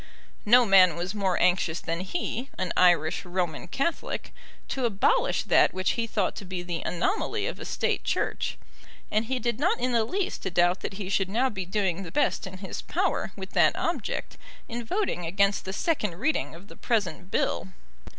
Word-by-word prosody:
No 245 Hz, +3 st, +7 dB
man 185 Hz, -5 st, +6 dB
was 175 Hz, +3 st, -3 dB
more 195 Hz, -4 st, 0 dB
anxious 175 Hz, -2 st, +2 dB
than 165 Hz, +1 st, -3 dB
he, 250 Hz, -, -3 dB
an 185 Hz, -2 st, -2 dB
Irish 175 Hz, -3 st, +4 dB
Roman 175 Hz, -3 st, -2 dB
Catholic, 295 Hz, -, -2 dB, 0.4 s
to 260 Hz, -2 st, -1 dB
abolish 235 Hz, -, +2 dB
that -, -, +4 dB
which 185 Hz, 0 st, +1 dB
he 230 Hz, -1 st, -1 dB
thought 210 Hz, -4 st, 0 dB
to -, -, -6 dB
be 185 Hz, -2 st, -5 dB
the 175 Hz, -2 st, -3 dB
anomaly 360 Hz, -, -1 dB
of -, -, -4 dB
a -, -, -7 dB
State -, -, -1 dB
Church, -, -, -1 dB, 0.5 s
and 215 Hz, +2 st, +1 dB
he 260 Hz, +3 st, -1 dB
did 235 Hz, -1 st, -1 dB
not 340 Hz, +6 st, +2 dB
in 250 Hz, +1 st, 0 dB
the 230 Hz, -2 st, +3 dB
least 355 Hz, -, -2 dB
doubt 175 Hz, +1 st, +4 dB
that -, -, -5 dB
he 195 Hz, -1 st, -5 dB
should 195 Hz, -1 st, +1 dB
now 250 Hz, +6 st, +1 dB
be 190 Hz, -3 st, -5 dB
doing 190 Hz, -2 st, 0 dB
the 175 Hz, -, -7 dB
best 290 Hz, -7 st, +1 dB
in 185 Hz, 0 st, -8 dB
his 190 Hz, 0 st, -6 dB
power -, -, -1 dB
with -, -, -8 dB
that -, -, +4 dB
object -, -, -3 dB, 0.3 s
in 240 Hz, +1 st, -4 dB
voting 230 Hz, -, -1 dB
against 200 Hz, +3 st, +1 dB
the 190 Hz, -, -3 dB
second 210 Hz, -, 0 dB
reading 250 Hz, -, -1 dB
of 180 Hz, +4 st, -13 dB
the -, -, -13 dB
present 190 Hz, -6 st, -1 dB
bill. 190 Hz, -, 0 dB
195 Hz, 190 wpm, -27 LUFS, 180-235 Hz, 0.5 s, No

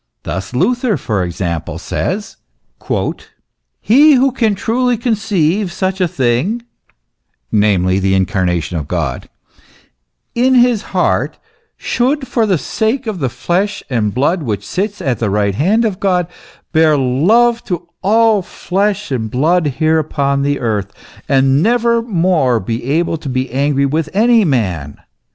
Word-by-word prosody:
Thus 95 Hz, +1 st, -5 dB
Luther, 235 Hz, -, +1 dB
for 105 Hz, -7 st, -2 dB
example, 85 Hz, -2 st, -4 dB
says, -, -, -4 dB, 0.2 s
" -, -, -7 dB
He 295 Hz, +5 st, +7 dB
who 265 Hz, +1 st, +3 dB
can 225 Hz, -5 st, 0 dB
truly 245 Hz, +4 st, 0 dB
conceive 205 Hz, -5 st, 0 dB
such 190 Hz, +1 st, -2 dB
a 180 Hz, -, +3 dB
thing 140 Hz, -, 0 dB, 0.9 s
(namely, 95 Hz, -3 st, +2 dB
the 95 Hz, 0 st, +1 dB
incarnation 90 Hz, -3 st, 0 dB
of 75 Hz, -, -6 dB
God) -, -, -3 dB, 1.0 s
in 255 Hz, +2 st, +2 dB
his 245 Hz, -3 st, +4 dB, 0.2 s
heart, -, -, +1 dB, 0.4 s
should, 265 Hz, +3 st, -1 dB
for 225 Hz, -3 st, +1 dB
the 190 Hz, -4 st, +2 dB
sake 230 Hz, -, -1 dB
of 215 Hz, -5 st, -4 dB
the 135 Hz, -4 st, -1 dB
flesh 185 Hz, -, -2 dB
and 110 Hz, -4 st, 0 dB
blood 145 Hz, -, 0 dB
which 110 Hz, -8 st, -3 dB
sits 205 Hz, +2 st, -3 dB
at 130 Hz, -3 st, -1 dB
the 110 Hz, -, 0 dB
right 100 Hz, 0 st, +1 dB
hand 200 Hz, -, +2 dB
of 200 Hz, -4 st, -2 dB
God, 180 Hz, -3 st, +1 dB, 0.5 s
bear 155 Hz, -2 st, +4 dB
love 210 Hz, -, +2 dB
to 175 Hz, -2 st, -4 dB
all 220 Hz, +1 st, +3 dB
flesh 195 Hz, 0 st, -2 dB
and 115 Hz, -4 st, -2 dB
blood 160 Hz, +7 st, +1 dB
here 160 Hz, 0 st, +2 dB
upon 140 Hz, -2 st, -1 dB
the 140 Hz, 0 st, 0 dB
earth, 105 Hz, -4 st, -2 dB, 0.4 s
and 135 Hz, +1 st, +3 dB
never 235 Hz, +2 st, +2 dB
more 170 Hz, -, +1 dB
be 115 Hz, +4 st, -4 dB
able 165 Hz, +4 st, 0 dB
to 145 Hz, -, -6 dB
be 130 Hz, 0 st, -2 dB
angry 140 Hz, +1 st, +1 dB
with 155 Hz, +3 st, -1 dB
any 230 Hz, +1 st, +4 dB
man. 90 Hz, -, -1 dB
160 Hz, 145 wpm, -15 LUFS, -, 1.0 s, He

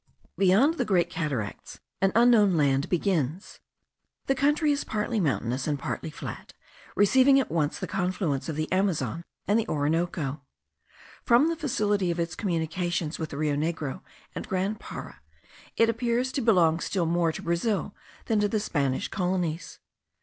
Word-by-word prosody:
Beyond 210 Hz, -, +3 dB
the -, -, +3 dB
Great 185 Hz, -6 st, +1 dB
Cataracts 140 Hz, -, -4 dB, 0.2 s
an 195 Hz, 0 st, +3 dB
unknown 225 Hz, -6 st, +5 dB
land 140 Hz, -2 st, +2 dB
begins. 175 Hz, -2 st, -1 dB, 0.7 s
The 270 Hz, -, +2 dB
country 295 Hz, +3 st, +2 dB
is 285 Hz, -, 0 dB
partly 215 Hz, +1 st, -2 dB
mountainous 130 Hz, -, -1 dB
and 150 Hz, -2 st, 0 dB
partly 140 Hz, -, -4 dB
flat, 150 Hz, -, -8 dB, 0.4 s
receiving 260 Hz, +6 st, +5 dB
at 270 Hz, -, -2 dB
once 155 Hz, -3 st, 0 dB
the -, -, -4 dB
confluents 180 Hz, -6 st, -2 dB
of 155 Hz, -, -3 dB
the 155 Hz, +1 st, -3 dB
Amazon 185 Hz, -3 st, 0 dB, 0.2 s
and 210 Hz, +3 st, +3 dB
the 225 Hz, -, -2 dB
Orinoco. 150 Hz, -1 st, -1 dB, 0.8 s
From 245 Hz, +6 st, +4 dB
the 335 Hz, -, -1 dB
facility 210 Hz, -, 0 dB
of 170 Hz, 0 st, -2 dB
its 170 Hz, 0 st, -2 dB
communications 175 Hz, -3 st, -2 dB
with 160 Hz, -1 st, -3 dB
the 140 Hz, -, -7 dB
Rio 150 Hz, -1 st, 0 dB
Negro 155 Hz, 0 st, -2 dB, 0.3 s
and -, -, -6 dB
Grand 195 Hz, +3 st, -1 dB
Para, -, -, -9 dB, 0.6 s
it 230 Hz, -, +5 dB
appears 235 Hz, +2 st, 0 dB
to 270 Hz, -, -2 dB
belong 175 Hz, -8 st, +4 dB
still 180 Hz, 0 st, -1 dB
more 170 Hz, 0 st, +1 dB
to -, -, -8 dB
Brazil 190 Hz, +4 st, -1 dB, 0.3 s
than 220 Hz, -2 st, +1 dB
to 205 Hz, -, +2 dB
the 215 Hz, +1 st, 0 dB
Spanish 140 Hz, -10 st, -1 dB
colonies. 180 Hz, -3 st, -2 dB
180 Hz, 155 wpm, -27 LUFS, 160-215 Hz, 0.8 s, unknown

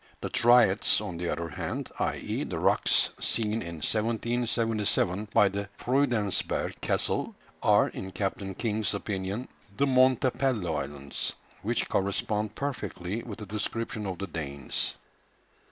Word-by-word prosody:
The -, -, -4 dB
"Triads," 120 Hz, 0 st, +5 dB
on 85 Hz, -, -5 dB
the 85 Hz, 0 st, -2 dB
other 85 Hz, 0 st, -2 dB
hand, 75 Hz, -, -4 dB
i.e. -, -, -1 dB
the -, -, -4 dB
rocks -, -, +3 dB
seen 110 Hz, 0 st, 0 dB
in 85 Hz, 0 st, -5 dB
1777 110 Hz, -3 st, +1 dB
by 105 Hz, -3 st, +6 dB
the 100 Hz, +1 st, -3 dB
Freudensberg 120 Hz, -7 st, 0 dB
Castle, -, -, 0 dB, 0.3 s
are, -, -, +5 dB
in 95 Hz, -, -6 dB
Captain 95 Hz, -1 st, -3 dB
King's 110 Hz, -1 st, 0 dB
opinion, 100 Hz, +3 st, -3 dB, 0.3 s
the 140 Hz, -, +4 dB
Montepello 130 Hz, -, +3 dB
Islands, 70 Hz, -1 st, -3 dB, 0.3 s
which -, -, 0 dB
correspond 105 Hz, +2 st, 0 dB
perfectly 115 Hz, -7 st, -3 dB
with 110 Hz, -4 st, -7 dB
the 105 Hz, -, -7 dB
description 105 Hz, +1 st, -3 dB
of 95 Hz, -2 st, -3 dB
the 100 Hz, -, -3 dB
Danes. 70 Hz, -7 st, -2 dB
105 Hz, 125 wpm, -29 LUFS, 95-115 Hz, 0.3 s, by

